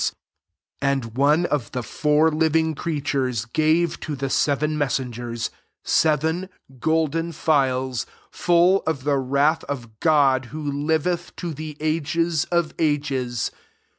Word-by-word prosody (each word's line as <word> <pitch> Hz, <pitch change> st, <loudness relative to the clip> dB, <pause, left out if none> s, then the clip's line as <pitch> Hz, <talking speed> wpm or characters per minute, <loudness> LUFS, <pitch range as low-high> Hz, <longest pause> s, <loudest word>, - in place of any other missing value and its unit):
7 -, -, 0 dB, 0.7 s
And 140 Hz, -3 st, +1 dB
one 150 Hz, +6 st, +3 dB
of 150 Hz, -8 st, -2 dB
the 125 Hz, -1 st, -2 dB
four 150 Hz, +4 st, +2 dB
living 160 Hz, +1 st, +2 dB
creatures 135 Hz, -7 st, -1 dB
gave 155 Hz, +6 st, +1 dB
to 150 Hz, -, -4 dB
the 135 Hz, 0 st, -3 dB
seven 150 Hz, +1 st, +1 dB
messengers 120 Hz, -5 st, -2 dB, 0.3 s
seven 160 Hz, +4 st, +1 dB, 0.3 s
golden 160 Hz, +3 st, 0 dB
phials 130 Hz, -6 st, +1 dB, 0.2 s
full 175 Hz, +2 st, +3 dB
of 150 Hz, -5 st, -1 dB
the 140 Hz, -1 st, +1 dB
wrath 140 Hz, +4 st, +2 dB
of 120 Hz, -6 st, -6 dB
God 140 Hz, -5 st, +3 dB
who 150 Hz, +3 st, -4 dB
liveth 160 Hz, +4 st, -1 dB
to 170 Hz, -3 st, -4 dB
the 155 Hz, 0 st, -7 dB
ages 160 Hz, +1 st, 0 dB
of 170 Hz, -2 st, 0 dB
ages. 140 Hz, -6 st, 0 dB
150 Hz, 125 wpm, -23 LUFS, 135-160 Hz, 0.7 s, one